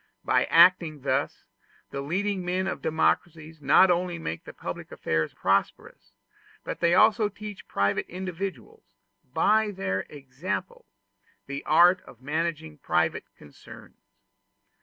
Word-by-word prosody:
By - - +3
acting 170 -3 +4
thus, 140 +1 -1 0.5
the 140 - -4
leading 190 +6 -2
men 180 +1 -1
of 190 - -4
democracies 160 0 -1
not 155 +7 +5
only 175 0 -1
make 85 - -5
public - - -7
affairs 80 0 -2
prosperous, - - -2 0.5
but - - -5
they 170 0 +3
also 215 0 +4
teach 210 0 -10
private 100 +1 0
individuals, 180 - -7 0.4
by 215 +8 +3
their 140 - -3
example, 155 - -6 0.6
the 140 0 -6
art 175 +4 +5
of 120 - -16
managing 155 +2 -3
private 85 -6 0
concerns. 75 -1 -15
165 Hz, 115 wpm, -26 LUFS, 140-185 Hz, 0.6 s, not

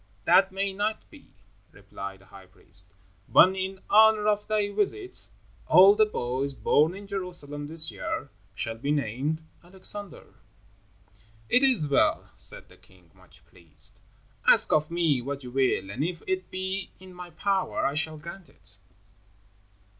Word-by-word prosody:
"That 195 0 +5
may 195 +1 -2
not 210 +2 -3
be," - - -16 0.4
replied 95 -1 -9
the - - -20
high 95 0 -15
priest, 95 +2 -4 0.3
"but 190 +1 +6
in 190 0 -4
honor 215 0 +5
of 210 0 -1
thy 210 -1 0
visit 215 - -2 0.4
all 190 +2 +8
the 215 0 +3
boys 135 -5 -3
born 155 +7 +2
in 200 +1 -10
Jerusalem 175 -7 -5
this 160 +1 +3
year 145 - -5 0.2
shall 115 +3 -5
be 140 +4 -4
named 145 +3 -1 0.2
Alexander." 190 +2 -1 1.2
"It 250 - +4
is 255 - +3
well," 140 - +1
said - - 0
the - - -19
king, 90 -3 -24
much - - -18
pleased; 90 +7 -7 0.5
"ask - - +7
of 155 0 +2
me 165 -6 +1
what 140 +2 -5
you 125 - -8
will, 130 -7 0
and 125 +8 -3
if 170 0 -4
it 185 0 -3
be 190 +1 -4
in 185 0 -14
my 180 0 -10
power 190 +3 -1
I 140 - 0
shall 155 +1 -2
grant 170 +1 -11
it." 105 - -6
165 Hz, 155 wpm, -26 LUFS, 135-195 Hz, 1.2 s, all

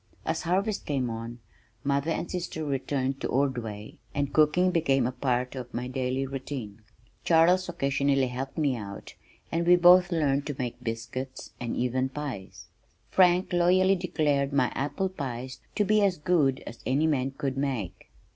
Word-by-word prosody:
As - - -1
harvest 195 +5 -1
came 130 -5 -1
on, 115 +1 -6 0.4
mother 140 +2 0
and 165 - -2
sister 170 -3 -4
returned 135 -1 -2
to - - -1
Ordway, 120 -6 -2 0.2
and 140 -1 -1
cooking 155 +4 +4
became 140 -7 +2
a 125 - 0
part 125 -1 -1
of 125 -2 -7
my 125 +1 -2
daily 130 +1 -1
routine. 130 -5 -6 0.4
Charles 175 +2 +4
occasionally 140 -3 +1
helped 130 +2 -5
out 105 -8 -4 0.4
and 170 +1 0
we 180 - +8
both 180 +1 +6
learned 145 -4 +1
to 145 - -3
make 125 -2 -4
biscuits 115 +3 -5
and 120 -1 -3
even 130 +2 0
pies. 135 -9 -6 0.5
Frank 180 0 +4
loyally 185 +2 +4
declared 150 -6 0
my 130 -4 +2
apple 145 +7 -1
pies 130 -7 -6 0.2
to 210 - +2
be 215 +1 +3
as 195 -3 +2
good 150 -5 +1
as 115 - -9
any 140 +5 +1
man 135 -4 +1
could 135 -2 -2
make. 125 -10 -3
140 Hz, 155 wpm, -27 LUFS, 125-170 Hz, 0.5 s, we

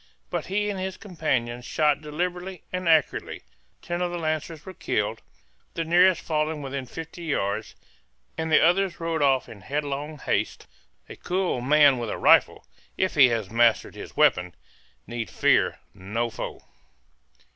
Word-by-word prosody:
But - - -3
he 205 +2 0
and 195 - -5
his 190 0 -4
companions 130 - -2
shot 150 +3 +1
deliberately 175 +4 -4
and 180 -2 -1
accurately; 160 -2 +1 0.4
ten 175 0 -3
of 180 - 0
the 175 - -3
lancers 155 -1 -3
were 190 - -8
killed, - - -2 0.5
the 165 - -2
nearest 175 +2 +4
falling 155 -1 -1
within 135 -1 -5
fifty 165 +4 -8
yards; 100 -10 -2 0.6
and 160 0 -3
the - - +7
others 185 +2 +2
rode 165 -2 -2
off 135 -2 +3
in 100 - -12
headlong 145 +5 -3
haste. - - -2 0.4
A - - -9
cool 180 -8 -1
man 140 0 +5
with 115 -2 -3
a - - -3
rifle, - - +4 0.3
if 190 - +1
he 135 -5 +7
has 110 -4 -2
mastered 115 0 +3
his - - -10
weapon, 90 -1 +3 0.5
need 120 -1 -5
fear - - +2 0.2
no 115 +5 -3
foe. - - -6
155 Hz, 155 wpm, -25 LUFS, 130-175 Hz, 0.6 s, the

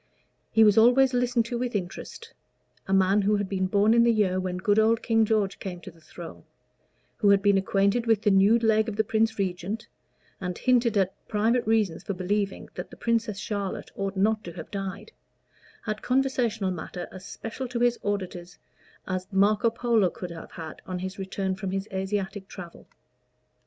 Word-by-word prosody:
He 225 - +5
was 210 0 +6
always 250 +3 +5
listened 245 -1 +1
to 235 0 -3
with 245 -2 -2
interest: 205 - -6 0.5
a - - -4
man 195 +1 +4
who 205 +2 +2
had 205 -1 -1
been 190 -1 -1
born 205 +3 +3
in 235 - +5
the 235 0 +5
year 195 -4 +1
when 185 -1 -3
good 205 +3 +2
old 225 +1 +3
King 225 -1 +3
George 210 -3 0
came 180 -2 -6
to - - -10
the 165 0 -22
throne 170 +1 -10 0.7
who 205 - +3
had 200 0 +4
been 200 -1 +4
acquainted 200 +4 +1
with 220 -2 +3
the 210 - +4
nude 200 +4 +4
leg 220 0 +3
of 210 - -5
the 220 - +2
Prince 220 +1 +1
Regent, 195 +3 -3 0.5
and 180 -2 -4
hinted 240 -4 +2
at 190 -1 +2
private 225 +2 +1
reasons 215 -7 +1
for 200 - -4
believing 195 +2 -2
that - - -7
the - - -13
Princess 230 -3 0
Charlotte 200 -1 -4
ought 195 0 -3
not 215 +2 +2
to 170 - -8
have 165 -2 -9
died 195 +1 -5 0.7
had 215 -1 -3
conversational 245 -6 0
matter 175 +1 -6
as 185 -1 -10
special 225 +6 -6
to 240 0 -4
his 240 0 +2
auditors 185 -3 -4 0.5
as 185 0 -3
Marco 205 +4 +3
Polo 230 -4 +2
could 175 0 -7
have 165 -1 -10
had 160 -2 -8
on 185 -1 -3
his 190 +2 -6
return 190 0 -2
from 190 0 -4
his 195 +2 -3
Asiatic 190 0 -3
travel. 175 -4 -11
205 Hz, 190 wpm, -26 LUFS, 190-225 Hz, 0.7 s, was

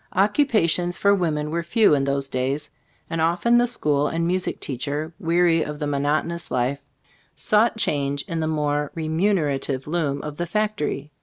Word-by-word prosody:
Occupations 190 - +2
for 200 0 +4
women 155 -5 -1
were 170 +1 -1
few 170 +3 +3
in 140 -2 +2
those 140 0 -1
days, 135 +3 -2 0.4
and 165 -1 -2
often 175 +9 +3
the 245 - +3
school 150 -11 +1
and 165 +2 -1
music 180 +1 -1
teach 130 0 -4
er, 150 +3 -3
weary 170 0 +3
of 150 -1 -4
the 150 - -3
monotonjous 150 +4 -1
life, 130 +3 -1 0.5
sought 220 +2 +2
change 140 -7 0
in 165 - -4
the 160 - -1
more 150 -2 -1
remunera 160 -3 0
tive 135 -1 -3
loom 150 -3 -1
of 150 -1 -6
the 175 - -2
factory. 195 -8 -2
160 Hz, 170 wpm, -23 LUFS, 145-175 Hz, 0.5 s, for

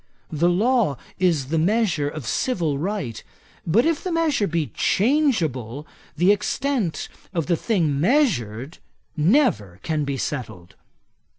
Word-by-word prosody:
The 165 +3 +2
law 210 - +2 0.2
is 165 -8 +1
the 165 +1 +1
measure 180 -5 +1
of 150 -3 -7
civil 165 - -1
right; 170 - -3 0.4
but 215 +9 +3
if 325 -2 0
the 370 - -3
measure 315 -10 +1
be 165 -3 -2
changeable, 165 - +1 0.3
the 180 +5 +5
extent 235 - -1 0.3
of 165 -3 0
the 175 - +2
thing 160 -8 0
measured 160 - +1 0.4
never 150 - +2
can 155 -2 -1
be 140 -1 -2
settled. 115 -11 -5
170 Hz, 125 wpm, -23 LUFS, 145-230 Hz, 0.4 s, the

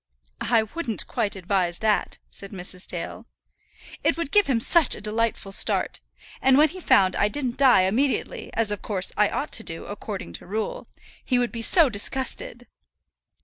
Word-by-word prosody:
"I 230 -2 +4
wouldn't 230 0 -3
quite 215 -4 -2
advise 185 -2 -1
that," 215 -1 0
said 195 - -7
Mrs. 185 -1 -4
Dale. - - -6 0.8
"It - - +2
would 335 -4 -4
give 415 -1 +4
him 255 -4 +1
such 320 +5 +4
a - - -9
delightful 215 -1 -1
start. - - -1 0.4
And 265 0 +5
when 305 +2 +5
he 370 - -9
found 190 - +3
I 205 - +2
didn't 250 +1 -1
die 265 -7 +5
immediately, 250 +9 -1
as 225 -2 +1
of 205 - -4
course 195 -3 -2
I - - +3
ought - - -3
to - - -1
do - - -7
according 85 - -7
to - - -15
rule, 215 +3 -4 0.4
he 250 - +1
would 245 -3 0
be 230 - -6
so 330 - +7
disgusted." 245 +1 -2
225 Hz, 175 wpm, -24 LUFS, 200-265 Hz, 0.8 s, so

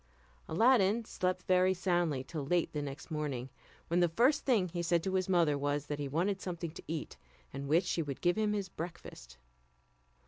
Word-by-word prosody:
Aladdin 225 +3 +4
slept 185 -3 -2
very 185 +1 +3
soundly 175 -7 0
till 155 +1 -5
late 170 +4 0
the 150 - -2
next 145 +3 -7
morning, 140 -5 -3 0.4
when 170 +2 +1
the 175 -1 +4
first 255 - +3
thing 225 -9 +3
he 175 +1 -3
said 170 0 +1
to 190 - -2
his 185 0 0
mother 165 -6 +3
was, 145 0 -1
that 145 -1 -4
he 145 - -2
wanted 185 +7 0
something 170 -3 -4
to - - -10
eat, 160 -1 -5 0.4
and 140 +1 -5
wished 165 +6 +3
she 170 - 0
would 140 -4 -5
give 175 0 +2
him 215 -1 +1
his 200 -2 -2
breakfast. 160 - -8
170 Hz, 195 wpm, -32 LUFS, 150-185 Hz, 0.4 s, Aladdin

